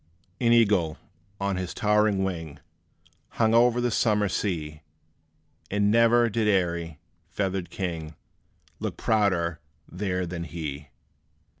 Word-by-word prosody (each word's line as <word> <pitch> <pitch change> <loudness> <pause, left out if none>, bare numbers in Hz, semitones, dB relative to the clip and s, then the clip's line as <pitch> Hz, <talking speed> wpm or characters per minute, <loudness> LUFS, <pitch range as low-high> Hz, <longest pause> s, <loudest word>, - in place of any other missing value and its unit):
An 115 -1 +3
Eagle, 100 -9 +3 0.4
on 100 -1 -1
his 90 -1 -4
towering 105 -2 +2
wing, 80 -6 -4 0.8
Hung 110 -1 +3
o'er 120 +1 +4
the 120 0 0
summer 105 -2 +2
sea; 80 -6 -3 0.9
And 100 +1 +2
ne'er 115 +1 +5
did 110 0 0
airy, 85 -5 0 0.3
feathered 95 -3 -2
king 80 -4 -5 0.6
Look - - -4
prouder 90 -6 +1 0.3
there 90 -1 -2
than 85 0 -5
he. 75 -3 -6
95 Hz, 115 wpm, -26 LUFS, 85-105 Hz, 0.9 s, ne'er